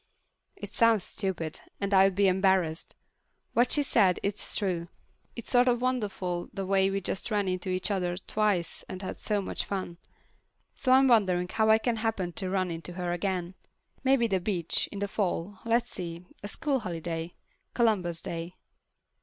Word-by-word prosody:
It - - -9
sounds 230 -4 +4
stupid, 180 -7 -3 0.2
and 200 0 -1
I'd 195 -1 +5
be 200 0 +4
embarrassed. 185 -3 +1 0.6
What 245 +2 +3
she 295 - +4
said, 195 -9 +3
it's 200 +1 -1
true—it's 185 +4 -5
sort 245 0 +5
of 245 0 +2
wonderful 200 -8 -1
the 195 -2 -4
way 190 0 +3
we 195 0 -1
just 190 +3 -3
ran 205 -3 +1
into 185 +1 -2
each 185 +3 -1
other 180 -3 -1
twice 200 -3 -1
and 185 +1 -6
had - - -5
so 210 -2 -1
much - - -3
fun. 185 -3 -4 0.7
So 255 - 0
I'm 265 +1 +6
wondering 185 -7 +3
how 220 +1 +2
I 220 - +7
can 230 +1 -1
happen 215 -6 -1
to 190 +1 -3
run 185 -2 0
into 165 +2 -5
her 175 -1 -3
again. 180 0 -2 0.5
Maybe 265 -2 +4
the 195 -4 +1
beach, 175 -3 0
in 205 - -6
the 200 0 -1
fall. 195 -1 -2
Let's 230 +1 +1
see, 170 -1 -6 0.2
a 205 - -5
school 280 +4 0
holiday—Columbus 175 +2 -2
Day. 170 +2 -5
195 Hz, 165 wpm, -29 LUFS, 180-220 Hz, 0.7 s, I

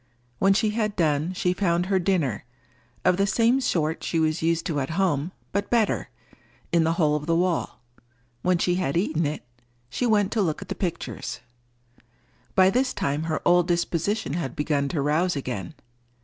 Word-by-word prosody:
When 195 0 +4
she 215 0 +2
had 215 -1 -1
done, 155 -1 +1
she 180 0 0
found 180 -2 +1
her 190 0 +1
dinner—of 125 - -2
the 195 0 +2
same 235 +6 +3
sort 160 -9 0
she 165 - 0
was 155 +1 +1
used 165 0 +1
to 160 -6 -1
at 135 - -2
home, 170 -4 +1 0.2
but 200 0 -2
better—in 210 -6 -2
the 165 +1 +2
hole 155 -3 +2
of 150 0 -4
the 165 - +2
wall. 175 0 -1 0.6
When 180 -1 +2
she 175 +1 +1
had 165 -2 0
eaten 165 -4 +1
it, 150 - -5 0.5
she 250 - 0
went 205 -3 +2
to 225 - +1
look 160 -5 0
at 195 - -10
the - - -1
pictures. 175 -4 -4 1.1
By 190 0 +6
this 255 +3 0
time 145 +3 -1
her 160 -1 -2
old 175 0 +4
disposition 175 +1 -1
had 160 -6 -3
begun 150 -2 0
to 140 -1 -1
rouse 160 +5 +1
again. 125 -10 -5
170 Hz, 175 wpm, -25 LUFS, 150-195 Hz, 1.1 s, By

